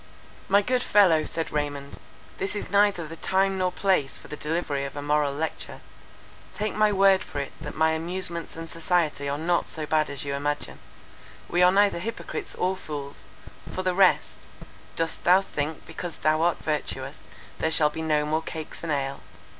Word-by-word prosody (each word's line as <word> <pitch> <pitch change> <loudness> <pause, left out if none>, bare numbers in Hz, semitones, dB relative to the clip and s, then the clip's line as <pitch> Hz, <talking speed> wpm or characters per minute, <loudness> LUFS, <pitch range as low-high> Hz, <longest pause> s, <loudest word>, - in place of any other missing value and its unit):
"My 200 +1 +5
good 250 +3 +1
fellow," 185 -9 +5
said 165 - -2
Raymond, 145 -1 -3 0.4
"this 195 +2 -1
is 205 - -4
neither 200 -5 +3
the 165 - -8
time 190 +2 +1
nor 185 -1 +1
place 185 -9 +1
for - - -14
the - - -5
delivery 150 -3 -2
of 140 - -6
a 145 - -4
moral 145 -1 +2
lecture: 155 +3 -4 0.8
take 215 0 -2
my 215 0 +3
word 195 0 +5
for 145 - -9
it 140 - -4
that - - -6
my 160 0 +3
amusements 170 +1 -2
and 165 0 -6
society 165 -4 0
are 140 - -1
not 170 +3 +1
so 155 -2 -4
bad 155 0 +2
as 140 0 -5
you 140 - -2
imagine. 145 +1 -2 0.7
We 175 - +1
are 180 0 +7
neither 200 -2 +3
hypocrites 230 +5 -5
or 185 +1 0
fools 145 -6 -7 0.5
—for 185 - -3
the 185 -1 +1
rest, 190 0 +3 0.6
'Dost 165 -1 -2
thou 180 +2 +7
think 155 -5 -4
because 165 +1 -6
thou 155 +1 +2
art 170 0 +3
virtuous, 150 -2 -3 0.4
there 160 - +1
shall 155 -2 +3
be 160 - -5
no 150 -2 +1
more 155 +2 0
cakes 160 -1 -7
and 165 - -3
ale? 140 -1 -1
160 Hz, 185 wpm, -26 LUFS, 150-185 Hz, 0.8 s, are